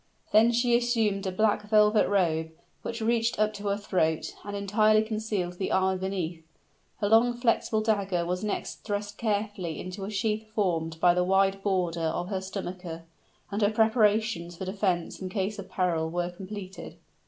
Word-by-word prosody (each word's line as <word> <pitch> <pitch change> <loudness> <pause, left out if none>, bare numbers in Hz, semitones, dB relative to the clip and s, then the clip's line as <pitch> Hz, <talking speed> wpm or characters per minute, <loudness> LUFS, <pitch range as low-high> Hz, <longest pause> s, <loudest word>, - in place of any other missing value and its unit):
Then 225 +2 +6
she 240 0 +3
assumed 225 -5 +1
a - - -1
black 210 +3 +2
velvet 210 0 +4
robe, 165 -5 +1 0.3
which 230 0 -5
reached 230 +1 +1
up 215 0 +2
to 205 0 -6
her 200 0 +1
throat, 160 -6 0
and 205 0 -5
entirely 215 +2 +3
concealed 215 -5 -3
the 190 - -1
armor 190 0 +2
beneath. 180 -4 -3 0.6
Her 205 - +2
long 230 +3 +4
flexible 230 -2 +1
dagger 200 -5 0
was 180 +2 -2
next 210 - -4
thrust 205 0 -4
carefully 205 -7 -2
into 185 +2 -6
a 195 - -4
sheath 215 +1 -1
formed 165 -5 0
by 175 +1 +5
the 180 0 +2
wide 195 +1 +2
border 180 -4 0
of 170 +2 -1
her 190 -2 -2
stomacher; 180 -3 -6 0.5
and 205 +2 -2
her 205 - +4
preparations 215 -5 +2
for 190 - -5
defense 185 -3 -1
in 185 - -4
case 200 +2 -2
of 190 -1 -8
peril 170 -4 0
were 175 +1 -2
completed. 190 +1 -8
200 Hz, 170 wpm, -28 LUFS, 180-215 Hz, 0.6 s, Then